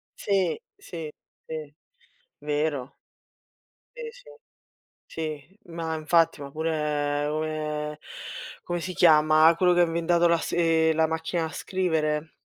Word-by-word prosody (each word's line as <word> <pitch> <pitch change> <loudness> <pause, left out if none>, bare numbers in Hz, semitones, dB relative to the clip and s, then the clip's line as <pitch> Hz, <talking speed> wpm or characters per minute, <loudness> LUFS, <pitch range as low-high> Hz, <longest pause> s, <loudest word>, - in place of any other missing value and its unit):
sì, 195 - 0 0.2
sì, 165 - -7 0.4
sì, 155 -2 -6 0.7
vero. 145 -3 -2 1.0
Sì, 470 -2 -6
sì, - - -17 0.8
sì, 155 +3 -6
ma 165 -1 -3
infatti, 160 -1 +2
ma 140 - -7
pure 150 -2 -1
come 150 -1 -3 0.6
come 175 0 -3
si 185 +2 -4
chiama 155 -1 +6
quello 180 0 +4
che 175 - +3
ha 175 - +7
inventato 170 +1 +2
lass 170 -1 +1
ehm, 165 -1 +3
la 160 0 +3
macchina 160 +1 -2
a - - -2
scrivere? 160 -4 -1
160 Hz, 120 wpm, -26 LUFS, 150-170 Hz, 1.0 s, ha